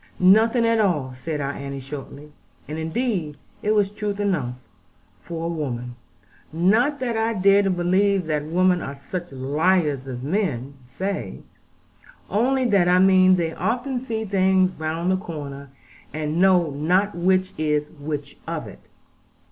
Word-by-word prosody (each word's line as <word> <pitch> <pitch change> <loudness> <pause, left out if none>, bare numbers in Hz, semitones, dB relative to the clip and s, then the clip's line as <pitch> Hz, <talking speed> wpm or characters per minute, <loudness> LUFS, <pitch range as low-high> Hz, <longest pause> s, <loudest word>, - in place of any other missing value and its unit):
"Nothing 220 +6 +5
at 230 0 +2
all," 150 -11 +1
said 150 +3 -4
our 140 0 -1
Annie 140 -1 -6
shortly. 140 +2 -9 0.4
And 155 +1 -5
indeed 160 - -2 0.2
it 215 +1 +1
was 200 -2 +2
truth 205 -1 -4
enough 165 -12 -1 0.7
for 165 -1 -5
a 170 - -2
woman. 125 -6 -4 0.6
Not 220 - +2
that 240 -3 -1
I 225 +1 0
dare 200 +1 +5
to 195 - 0
believe 185 +1 +2
that 150 -2 -1
women 180 +2 +2
are 140 - -5
such 175 +5 -6
liars 145 +1 +1
as 125 -1 -6
men 140 - -1
say; 195 +9 -4 0.9
only 255 +5 +2
that 200 -6 +3
I 180 0 +5
mean 185 0 +6
they 165 -2 -1
often 245 +8 -2
see 225 -3 -3
things 190 -1 +3
round 165 +3 -1
the 185 - +2
corner, 145 -7 -7 0.4
and 155 +2 -2
know 180 -4 +4
not 180 +8 +1
which 185 +2 +1
is 150 -1 0
which 145 -1 -5
of - - -3
it. - - -11
180 Hz, 150 wpm, -23 LUFS, 150-200 Hz, 0.9 s, mean